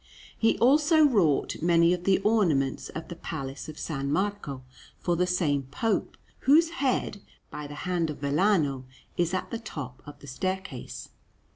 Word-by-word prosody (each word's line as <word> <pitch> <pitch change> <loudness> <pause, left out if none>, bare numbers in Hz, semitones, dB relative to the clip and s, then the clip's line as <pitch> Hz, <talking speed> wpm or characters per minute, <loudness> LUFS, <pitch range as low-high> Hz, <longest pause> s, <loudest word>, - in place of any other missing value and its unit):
He 225 - +2
also 300 +5 +5
wrought 185 - +2
many 170 +1 +4
of 180 0 -4
the 195 -1 +4
ornaments 170 -12 +1
of 160 - -7
the 170 - -7
Palace 135 -4 -6
of 155 - -8
S. - - -6 0.2
Marco 150 -3 -2 0.3
for 175 - 0
the 180 +1 +1
same 150 -7 0
Pope, 220 +10 -1 0.2
whose 320 +4 +4
head, 260 - -1 0.3
by 150 -1 -6
the 145 - -9
hand 175 -3 0
of 150 - -5
Vellano, 145 -3 +1 0.3
is 175 -1 +1
at 185 - -4
the 230 - -3
top 145 - -7
of 145 - -10
the - - -15
staircase. 185 0 -5
175 Hz, 160 wpm, -27 LUFS, 145-205 Hz, 0.3 s, also